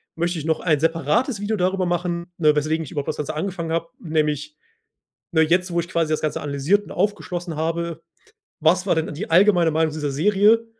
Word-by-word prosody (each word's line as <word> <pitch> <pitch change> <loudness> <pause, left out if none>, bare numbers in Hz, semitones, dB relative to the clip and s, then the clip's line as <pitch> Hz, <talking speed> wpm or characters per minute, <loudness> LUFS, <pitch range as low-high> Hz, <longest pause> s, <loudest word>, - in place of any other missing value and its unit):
möchte 170 0 -1
ich 150 - -6
noch 160 -1 +1
ein 155 -5 +2
separates 165 - +1
Video 215 +1 -1
darüber 185 0 +1
machen, 175 0 -2
ne, 155 -3 +4
weswegen 155 +2 0
ich - - -11
überhaupt 145 -2 -3
das - - -3
Ganze 150 +1 -3
angefangen 170 0 -3
habe. 165 0 -2
Nämlich, 155 - -1 0.8
ne, 160 -2 +3
jetzt, 180 +3 +2
wo 170 - 0
ich 170 - -6
quasi 165 -3 0
das 155 - 0
Ganze 155 - -1
analysiert 145 +8 +1
und - - -14
aufgeschlossen 180 -4 -2
habe: 165 +1 -2 0.6
Was 170 +4 +3
war 185 - +2
denn 160 -1 -2
die 205 +9 -5
allgemeine 175 -2 +5
Meinung 160 0 +1
dieser 150 -2 -2
Serie? 210 +9 +3
165 Hz, 200 wpm, -22 LUFS, 155-185 Hz, 0.8 s, allgemeine